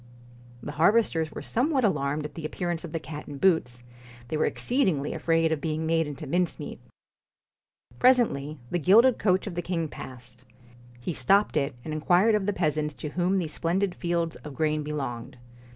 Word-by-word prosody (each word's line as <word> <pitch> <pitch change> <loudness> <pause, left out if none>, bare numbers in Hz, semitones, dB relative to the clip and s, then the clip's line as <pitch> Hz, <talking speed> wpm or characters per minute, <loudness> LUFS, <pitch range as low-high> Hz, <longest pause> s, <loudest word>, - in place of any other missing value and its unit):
The 145 - -5
harvesters 165 0 +2
were - - -7
somewhat 265 +2 +1
alarmed 150 -6 0
at 150 - -7
the 165 - -8
appearance 175 +2 -3
of 170 - -7
the 165 - -2
cat 150 -1 -8
in 145 - -7
boots; 130 -8 +1 0.5
they - - -2
were 155 - +2
exceed 255 -1 +1
ingly 145 -5 -1
afraid 165 -1 +1
of 155 -2 -1
being 160 +1 -2
made 165 -1 +1
into 145 +1 -7
mincemeat. 175 +5 -2 1.2
Presently 215 - +3
the 175 - 0
gilded 225 - +5
coach 185 -2 +2
of 200 - -5
the 175 - -2
king 170 -3 -2
passed. 125 -3 -10 0.6
He 145 +8 -4
stopped 195 +10 +3
it 140 -3 0
and 155 - -4
inquired 175 +8 +3
of 210 -2 +1
the - - +3
peasants 155 -3 -1
to 150 - -5
whom 180 +5 0
these 165 -5 -2
splendid 180 +3 0
fields 170 -2 -2
of 150 -2 -10
grain 155 0 0
belonged. 135 -6 -5
160 Hz, 180 wpm, -27 LUFS, 150-185 Hz, 1.2 s, gilded